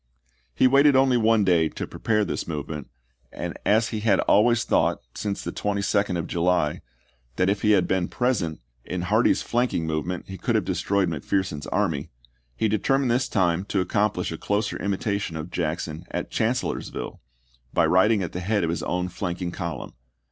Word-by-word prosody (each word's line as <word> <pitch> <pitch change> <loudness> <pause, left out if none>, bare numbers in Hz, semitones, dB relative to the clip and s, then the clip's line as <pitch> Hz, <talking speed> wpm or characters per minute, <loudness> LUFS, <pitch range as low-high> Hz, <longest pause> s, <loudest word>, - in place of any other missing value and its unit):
He - - +4
waited 140 +2 +6
only 130 -1 +4
one 115 -2 +4
day 85 -4 +3
to - - -5
pre - - -11
pare 105 -2 +2
this - - -3
movement, 75 -2 -5 0.4
and - - -5
as 110 +2 +3
he 110 - -3
had 105 -3 +3
always 115 +3 +4
thought, - - +2 0.2
since 100 -2 -3
the - - -3
22d 100 -2 0
of 85 - -2
July, 85 -3 +1 0.5
that 95 +1 +2
if 100 - -2
he 105 0 +4
had 95 -3 +3
been 95 -2 +1
present 105 - -1 0.2
in 90 -1 -4
Hardee's 110 +6 +2
flanking 120 -8 0
movement 80 +3 -3
he 95 -1 -8
could - - 0
have - - +1
destroyed 100 -2 0
McPherson's 80 0 -2
army, - - -1 0.5
he 110 - +1
de 105 0 +1
termined 135 +4 +1
this 125 +3 +1
time 90 -3 +1
to 100 - -1
accomplish 95 0 0
a 80 - -6
closer 105 +1 -1
imita 100 +1 -1
tion 85 -4 -4
of 80 +2 -6
Jackson 80 -2 -3
at - - -4
Chancellorsville, 120 +3 -2 0.5
by - - +3
riding 100 +2 +4
at 85 - -4
the 90 - -4
head 100 +2 0
of 80 - 0
his 85 - -2
own 90 +1 -1
flanking 90 -1 -4
column. 85 -3 -5
95 Hz, 185 wpm, -25 LUFS, 85-110 Hz, 0.5 s, waited